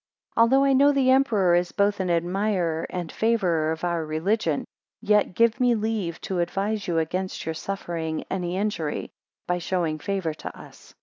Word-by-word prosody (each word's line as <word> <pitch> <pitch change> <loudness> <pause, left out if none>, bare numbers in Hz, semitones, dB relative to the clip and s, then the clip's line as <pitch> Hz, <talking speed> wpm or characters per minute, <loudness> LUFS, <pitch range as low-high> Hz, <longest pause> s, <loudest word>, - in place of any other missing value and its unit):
ALTHOUGH 245 +4 +5
I 275 -1 +4
know 280 +2 +5
the 270 -2 +3
emperor 220 -9 +3
is 175 0 +2
both 200 0 +1
an 185 -1 -1
admirer 175 -1 0
and 175 -3 -4
favourer 180 -9 +1
of 160 +1 -5
our 170 -2 0
religion, 160 +1 0 0.3
yet 210 -3 +2
give 230 +3 +3
me 245 -2 +3
leave 210 -6 -2
to 185 -2 -3
advise 200 +4 -1
you 170 -2 0
against 180 +4 -2
your 160 - -2
suffering 165 -3 -4
any 180 -1 -2
injury 195 -7 -2 0.3
(by 180 0 -1
showing 170 -3 -1
favour 190 -2 -2
to - - -9
us). - - -15
185 Hz, 170 wpm, -25 LUFS, 170-215 Hz, 0.3 s, ALTHOUGH